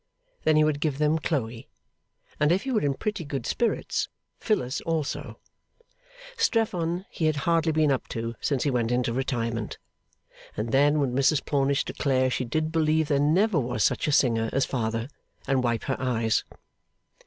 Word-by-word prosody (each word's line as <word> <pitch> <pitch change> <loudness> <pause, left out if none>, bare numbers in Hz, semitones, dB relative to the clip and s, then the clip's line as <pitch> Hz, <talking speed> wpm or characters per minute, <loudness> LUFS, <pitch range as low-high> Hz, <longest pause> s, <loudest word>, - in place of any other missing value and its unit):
Then 155 - +4
he 155 - +5
would 155 -2 +1
give 150 -3 -1
them 150 +2 +2
Chloe, 120 -7 -3 0.7
and 150 +1 +3
if 190 +4 +2
he 265 - -3
were 220 -4 +2
in 140 -2 0
pretty 210 0 -3
good 140 -5 -4
spirits, 235 - -1 0.3
Phyllis 135 - -1
also 145 -6 -3 1.0
Strephon 200 - 0
he 160 - -2
had 155 -1 +2
hardly 165 -1 +2
been 155 -2 +3
up 135 - -1
to 115 0 -4
since 140 -4 0
he 145 - +1
went 120 -2 0
into 125 -1 +1
retirement 115 -3 -2 0.8
and 110 +2 -2
then 145 +3 +4
would 135 -3 0
Mrs 135 +3 +2
Plornish 140 -1 +1
declare 130 -2 +1
she 125 - -1
did 155 +6 -1
believe 160 -1 +2
there 140 -2 +2
never 170 +6 +3
was 125 -3 -1
such - - +1
a - - +2
singer 115 -5 +2
as 135 - +1
Father, 115 -2 -2 0.4
and 135 -2 +1
wipe 120 -2 0
her 135 - -2
eyes. 115 -3 +1
140 Hz, 170 wpm, -26 LUFS, 125-155 Hz, 1.0 s, he